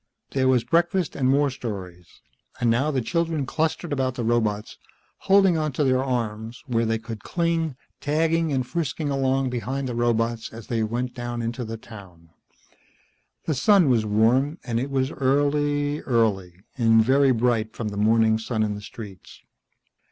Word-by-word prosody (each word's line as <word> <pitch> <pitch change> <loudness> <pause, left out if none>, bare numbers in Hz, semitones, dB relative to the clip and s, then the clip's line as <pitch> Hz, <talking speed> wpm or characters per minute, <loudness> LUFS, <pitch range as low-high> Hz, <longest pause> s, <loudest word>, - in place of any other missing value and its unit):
There 130 -1 +1
was 125 -3 +3
breakfast 175 0 +1
and 130 -2 +1
more 140 +1 +3
stories, 95 -8 -8 0.4
and 120 -2 +2
now 130 +6 +1
the 135 -5 -1
children 165 -1 -1
clustered 160 +3 -1
about 130 -2 -1
the 120 - -3
robots, 110 -3 -1 0.4
holding 195 -3 +4
onto 155 -2 -1
their 130 -1 +2
arms, 115 -3 -3
where 115 -4 0
they 115 0 +1
could 110 -1 -8
cling, 165 -4 -1 0.2
tagging 160 +2 +1
and 130 -2 0
frisking 155 0 -2
along 135 -1 +1
behind 130 +3 -3
the 125 - -3
robots 115 -1 0
as 115 0 -10
they 115 -2 -1
went 120 +3 -2
down 120 -1 -4
into 120 +2 -3
the 115 0 -5
town. 95 -7 -14 1.1
The 160 - 0
sun 175 +4 +4
was 115 -3 +3
warm, 120 +8 +2
and 115 -2 -1
it 135 +3 -3
was 135 0 0
early, 145 +2 +1
early, 95 -8 0 0.2
and 115 -1 +5
very 135 +2 +4
bright 115 -2 0
from 110 -2 -3
the 100 - -7
morning 110 +1 +3
sun 110 -1 -1
in 105 -1 -1
the 105 - -7
streets. 105 -3 -11
125 Hz, 165 wpm, -24 LUFS, 115-145 Hz, 1.1 s, and